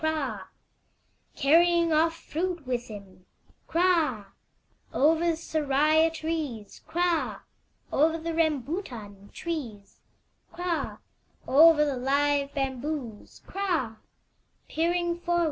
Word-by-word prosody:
Carrying 335 +3 +4
off 325 +1 +3
fruit 340 -1 -4
with 245 -1 -2
him, 190 -4 -12 0.4
Kra! 330 - +2 0.7
Over 315 +3 +3
the 340 -1 +2
seraya 310 0 +2
trees, 315 -10 -5
Kra! 345 -1 0 0.5
Over 320 +3 +3
the 330 +1 -4
rambutan 270 - -3
trees, 240 - -6 0.5
Kra! 350 -2 -3 0.5
Over 300 +2 +6
the 280 -3 -2
live 280 +2 +1
bamboos, 265 -4 -4
Kra! 335 - -2
305 Hz, 80 wpm, -27 LUFS, 255-330 Hz, 0.7 s, Over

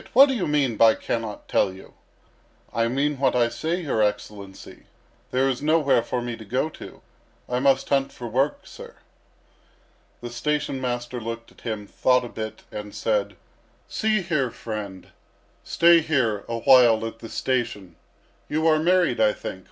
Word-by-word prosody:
What 275 +3 +8
do - - +1
you 225 -8 -1
mean 140 -6 +1
by 110 0 +6
'cannot 115 -3 -4
tell 95 - +2
you?'" 95 +1 -14 0.8
"I 115 0 +1
mean 140 +3 -1
what 135 - +2
I 120 -1 +3
say, 160 +10 -2
your 130 -8 0
Excellency. 105 -2 -4 0.4
There 130 +1 +1
is 130 -1 -1
nowhere 150 -4 +3
for 120 +1 -3
me 120 -1 -4
to 110 - -10
go 125 +8 -1
to. - - -12 0.4
I 125 0 -1
must 135 0 +2
hunt 135 -1 +1
for 120 - -8
work, 130 +6 0
sir." - - -12 1.3
The 120 0 -7
station 135 +2 -2
master 120 -1 -3
looked 115 +1 -6
at - - -21
him, 110 -3 -4
thought 125 +4 +1
a - - -7
bit, 110 -1 -7
and 105 -1 -7
said: 105 -3 -1 0.5
"See 215 -3 0
here, 155 -7 0
friend, 105 -5 -7 0.5
stay 170 0 +5
here 130 -10 0
a 115 - -2
while 115 -4 +6
at 115 0 -7
the 115 - -9
station. 105 -9 -2 0.5
You 155 +1 0
are 155 -1 +4
married, 180 - +2
I - - +4
think. - - -7
125 Hz, 165 wpm, -24 LUFS, 115-150 Hz, 1.3 s, What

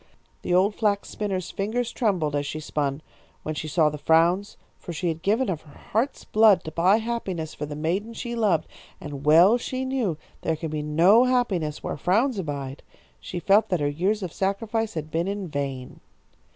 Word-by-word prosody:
The - - -4
old 190 +4 +4
flax 205 -2 0
spinner's 190 -4 -3
fingers 230 +4 -2
trembled 180 - 0
as 145 0 -1
she 155 - -4
spun, 145 -1 -2 0.4
when 155 - -3
she 155 - -5
saw 155 0 +3
the 150 - -7
frowns, 170 +6 +2 0.2
for 175 - -7
she 170 +2 -1
had 165 0 -4
given 220 +8 +1
of 165 -5 -2
her 145 - -17
heart's 240 +7 -2
blood 215 -4 +5
to 155 - -6
buy 180 +6 +4
happiness 200 -9 -3
for 150 - -5
the 145 - -6
maiden 190 +9 -2
she 240 0 -5
loved, 200 -9 +1 0.3
and 145 -1 -7
well 175 +10 +7
she 255 +2 -3
knew 250 - -1 0.2
there 160 - 0
can 160 0 -5
be 155 -1 -2
no 170 +11 +5
happiness 195 -12 0
where - - -3
frowns 210 - +1
abide. 140 -4 -5 0.4
She 175 - -6
felt 200 +5 +3
that 180 -3 +1
her 145 - +1
years 190 +8 0
of 175 - -5
sacrifice 220 +3 -1
had 155 -1 -5
been 170 +3 0
in 200 -1 -3
vain. 140 -4 -5
180 Hz, 190 wpm, -25 LUFS, 155-215 Hz, 0.4 s, well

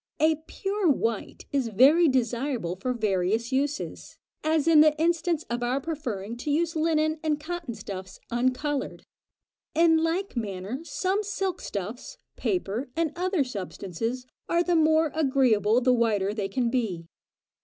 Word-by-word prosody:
A 315 0 +4
pure 395 -2 -1
white 230 -5 -1
is 275 -4 +1
very 275 - +5
desirable 245 - 0
for 225 +7 -3
various 215 +1 0
uses, 280 +3 -2 0.3
as 310 0 +1
in 320 -2 +7
the 305 0 +4
instance 330 -1 +1
of 240 +1 -3
our 245 +3 0
preferring 240 -9 -4
to 260 - -5
use 325 +3 +1
linen 315 0 +1
and 305 -2 0
cotton 330 -5 -5
stuffs 190 -3 -8
uncoloured. 255 +4 -1 0.7
In 330 0 +5
like 335 +4 -1
manner 205 +1 -4
some 370 +7 -1
silk 385 -3 -3
stuffs, 205 +5 -6 0.2
paper, 255 - -2
and 325 -2 0
other 365 -2 +1
substances, 225 +1 -4 0.2
are 340 0 +3
the 350 0 +1
more 315 -1 +4
agreeable 255 -7 +3
the 255 0 +4
whiter 210 -4 +1
they 205 -3 -3
can 235 +3 0
be. 210 -10 -1
270 Hz, 145 wpm, -27 LUFS, 225-320 Hz, 0.7 s, in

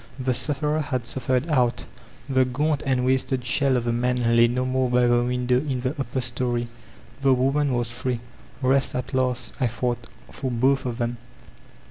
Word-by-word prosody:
The 130 -1 0
sufferer 145 +5 0
had 130 -4 -2
''suffered 130 +2 -1
ouf*; 125 -4 +1 0.4
the 130 -1 +3
gaunt 145 +4 0
and 130 -2 +1
wasted 130 -1 +1
shell 130 +1 +2
of 120 - -1
the 120 0 0
man 120 -1 +1
lay 115 0 +6
no 125 +2 -1
more 130 0 0
by 125 0 +3
the 120 0 +3
window 125 0 +1
in 135 -3 -3
the 130 +1 -1
upper 135 -3 -3
story. 120 -1 -1 0.5
The 135 -2 +4
woman 135 +1 +1
was 120 -1 0
free. 125 0 -2 0.4
'Kest 135 +1 +2
at 125 +1 -4
last,*' 130 -1 0
I 130 - +2
thought, 120 +1 -3 0.2
''for 130 - -3
both 130 +3 +1
of 120 -2 -4
them. 120 -1 -2
125 Hz, 180 wpm, -24 LUFS, 120-130 Hz, 0.5 s, lay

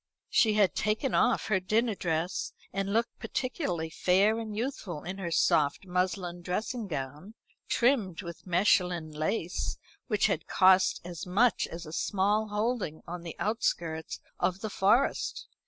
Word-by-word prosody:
She 220 -3 +4
had 205 -3 +4
taken 215 +5 0
off 245 - +3
her 195 -3 +2
dinner 220 +5 +1
dress, 170 -1 -2 0.2
and 195 +1 -1
looked 225 +2 0
particularly 180 - -2
fair 200 +7 +3
and 215 -2 -5
youthful 215 - -4
in 185 +3 -6
her 180 -3 -3
soft 150 0 +2
muslin 180 -1 -1
dressing 215 +6 -3
gown, 150 +6 -6 0.3
trimmed 225 -8 +1
with 170 +1 -9
Mechlin 180 -3 +2
lace 165 +3 -2 0.3
which - - +2
had - - 0
cost 185 0 +4
as 175 -1 -6
much 220 +6 +3
as 170 +1 -7
a 155 - -9
small 205 +4 +1
holding 210 -6 -2
on 175 0 -6
the 170 -1 -7
outskirts 170 -7 -1 0.2
of 185 +1 0
the 220 - -4
Forest. 205 +8 +2
190 Hz, 145 wpm, -29 LUFS, 175-215 Hz, 0.3 s, She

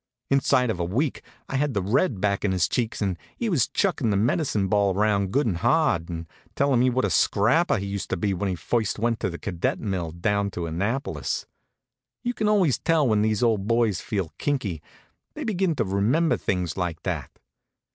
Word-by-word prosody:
Inside 130 -3 +3
of 90 - -5
a - - 0
week 120 - -1 0.3
I 135 - -2
had 140 -3 0
the 100 - +1
red 115 - +1
back 100 0 0
in 100 -2 +1
his 90 -3 +2
cheeks, 115 -3 -1
and 95 -4 -2 0.2
he 235 - -1
was 150 - +2
chuckin' 175 - 0
the 100 - +2
medicine 110 - +1
ball 100 -1 +2
around 100 -2 +1
good 140 +5 +2
and 95 -7 0
hard, 85 0 +2
and 85 -1 -5 0.3
tellin' 140 -3 +2
me 130 +1 +4
what 130 +1 +1
a - - -1
scrapper 130 - +3
he 100 - -4
used 100 -1 -4
to - - -1
be 100 +3 0
when 95 +2 -2
he 90 - -1
first 105 +7 -1
went 115 +1 0
to 100 - -1
the 85 - -6
cadet 90 -5 -2
mill, 95 -6 -2
down 100 +5 0
to 90 -3 -4
Annapolis. 100 - -2 0.8
You 245 0 -1
can 215 -2 -1
always 190 - +3
tell 160 -4 +2
when 105 -2 +3
these 110 +1 +1
old 110 -4 +1
boys 115 -4 +2
feel 95 -6 -3
kinky 110 - -1 0.5
they - - -5
begin 190 -6 0
to 120 - +1
remember 110 - +2
things 90 -4 -2
like 85 -3 -3
that. 80 -9 -4
105 Hz, 205 wpm, -25 LUFS, 95-130 Hz, 0.8 s, me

